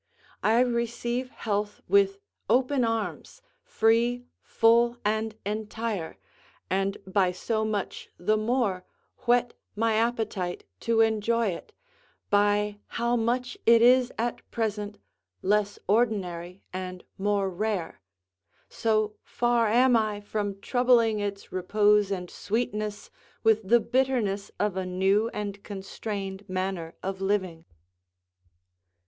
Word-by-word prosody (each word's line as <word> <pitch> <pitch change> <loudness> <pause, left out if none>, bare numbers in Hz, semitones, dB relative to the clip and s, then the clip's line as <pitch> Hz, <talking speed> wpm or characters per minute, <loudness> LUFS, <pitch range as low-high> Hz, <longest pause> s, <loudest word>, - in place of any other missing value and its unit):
I 225 +3 +4
receive 240 +1 -1
health 205 -3 -3
with 400 -1 +4 0.3
open 260 +1 +3
arms, 225 - -3 0.2
free, 240 - +2 0.2
full, 235 +1 +3
and 220 +1 0
entire, 210 - -3 0.5
and 195 +1 0
by 190 -1 +2
so 220 +4 -1
much 210 -3 -3
the 215 +5 +1
more 215 -4 0 0.4
whet 245 0 +3 0.2
my 225 +1 +1
appetite 220 -5 -1 0.2
to 230 -1 +2
enjoy 225 0 +2
it, 175 - -7 0.6
by 205 0 +2
how 235 +1 0
much 245 +2 -1
it 230 0 +7
is 250 +1 +5
at 235 +1 -2
present 210 -2 -3 0.5
less 205 +1 +1
ordinary 190 -5 0
and 185 -1 -5 0.2
more 200 0 +1
rare; 200 - -3 0.7
so 215 -2 0
far 240 -1 +1
am 245 +3 +4
I 215 -2 +1
from 205 -1 -3
troubling 240 -3 +3
its 200 -1 -4
repose 205 +2 +3
and 185 -3 -3
sweetness 210 0 -3 0.3
with 220 -3 +3
the 240 - +7
bitterness 235 -5 0
of 205 -2 0
a 190 - -1
new 195 +4 +2
and 200 -2 -5
constrained 195 0 -6
manner 185 -3 -3
of 190 0 -4
living. 190 -4 -1
215 Hz, 115 wpm, -27 LUFS, 195-235 Hz, 0.7 s, it